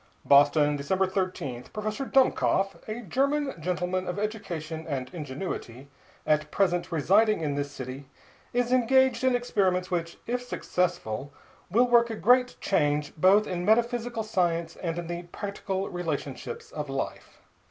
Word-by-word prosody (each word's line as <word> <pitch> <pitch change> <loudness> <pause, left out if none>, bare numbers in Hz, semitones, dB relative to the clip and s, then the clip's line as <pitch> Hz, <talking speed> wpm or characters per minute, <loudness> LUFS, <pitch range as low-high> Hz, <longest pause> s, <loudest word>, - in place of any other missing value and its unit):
BOSTON, 145 +1 +5
December 190 +7 +1
13 185 -10 -3
Professor 215 +5 -3
Dummkopf, 200 -7 +2
a 220 +3 -4
German 275 - 0
gentleman 180 +2 -2
of 180 - -3
education 170 -7 -4
and 130 -2 -4
ingenuity, 140 -4 -6 0.4
at 150 0 +1
present 175 -2 0
residing 200 +6 +3
in 150 -2 -1
this 145 0 -2
city, 135 0 -7 0.4
is 245 0 0
engaged 255 0 +3
on 260 -1 +4
experiments 190 -7 0
which, 170 -1 -2
if 245 +1 -1
successful, 175 - -2 0.4
will 235 +7 +4
work 235 -1 +5
a 225 - -3
great 250 +6 +3
change 150 -5 +1
both 190 +6 +5
in 180 -3 -3
metaphysical 235 +2 +1
science 170 -5 0
and 170 -2 -3
in 175 - -3
the 170 +1 -4
practical 200 -1 -3
relationships 145 -7 -5
of 150 -2 -5
life. 135 0 -5
180 Hz, 140 wpm, -27 LUFS, 150-220 Hz, 0.4 s, BOSTON